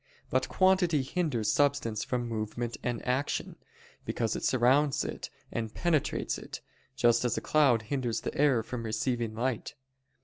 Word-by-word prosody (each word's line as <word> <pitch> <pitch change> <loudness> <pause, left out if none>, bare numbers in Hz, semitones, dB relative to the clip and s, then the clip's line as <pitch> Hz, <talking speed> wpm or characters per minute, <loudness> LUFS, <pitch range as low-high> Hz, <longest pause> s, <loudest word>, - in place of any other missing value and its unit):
But 130 0 +1
quantity 185 -6 +3
hinders 135 - 0
substance 140 -7 +1
from 120 -1 -2
movement 115 +1 -3
and 120 -1 -3
action, 130 +3 -1 0.5
because 115 -2 -1
it - - -4
surrounds 135 +3 +3
it - - -5 0.2
and 110 -2 -3
penetrates 160 -1 0
it: - - -8 0.4
just 120 -3 +3
as 120 -3 0
a - - -1
cloud 135 -7 +3
hinders 120 0 -2
the - - -4
air 140 -6 +3
from 125 +1 -5
receiving 115 0 -2
light. 125 +4 -2
125 Hz, 145 wpm, -30 LUFS, 115-145 Hz, 0.5 s, quantity